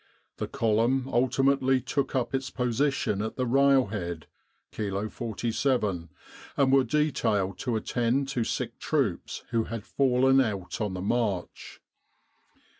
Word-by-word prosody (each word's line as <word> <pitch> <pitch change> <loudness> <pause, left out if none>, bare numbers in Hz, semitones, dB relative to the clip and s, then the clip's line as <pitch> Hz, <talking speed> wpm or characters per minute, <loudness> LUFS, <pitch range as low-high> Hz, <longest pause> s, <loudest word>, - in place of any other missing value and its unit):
The - - -3
column 115 +4 +1
ultimately 135 +1 +2
took 140 +2 -2
up 130 -1 -1
its 135 0 -1
position 125 -4 0
at 110 - -4
the 130 - -1
railhead', 115 - +2 0.5
Kilo 100 0 -3
47, 110 - -1 0.5
and 135 -1 +3
were 135 -1 +6
detailed 115 -9 0
to 125 -3 -1
attend 120 +4 0
to 125 -4 0
sick - - -3
troops - - -1
who 115 -2 +1
had 115 -2 -6
fallen 135 0 +3
out 100 -5 -3
on 105 -3 -2
the 90 - -4
march. 105 -4 -2
120 Hz, 125 wpm, -27 LUFS, 105-135 Hz, 0.5 s, were